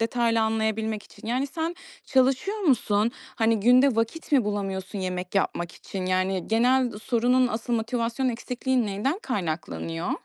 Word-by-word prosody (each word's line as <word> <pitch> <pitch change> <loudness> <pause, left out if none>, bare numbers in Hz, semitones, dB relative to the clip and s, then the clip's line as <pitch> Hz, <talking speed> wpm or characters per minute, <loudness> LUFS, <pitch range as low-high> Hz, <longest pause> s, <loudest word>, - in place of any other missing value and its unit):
detaylı 230 0 +1
anlayabilmek 220 -1 0
için. - - -14
Yani, 255 +4 0
sen 325 +4 -3 0.3
çalışıyor 265 +11 +2
musun? 235 - +2 0.3
Hani, 225 -2 +2
günde 250 +2 +5
vakit 230 +9 -2
mi 260 -6 +5
bulamıyorsun 195 -1 -3
yemek 180 0 -4
yapmak 175 -3 0
için? 185 -2 -6
Yani, 185 -1 0
genel 245 +3 +3
sorunun 245 +3 +2
asıl 235 +1 -3
motivasyon 235 +2 0
eksikliğin 250 +1 -1
neyden 210 - -1
kaynaklanıyor? 155 - -3
225 Hz, 135 wpm, -26 LUFS, 200-255 Hz, 0.3 s, günde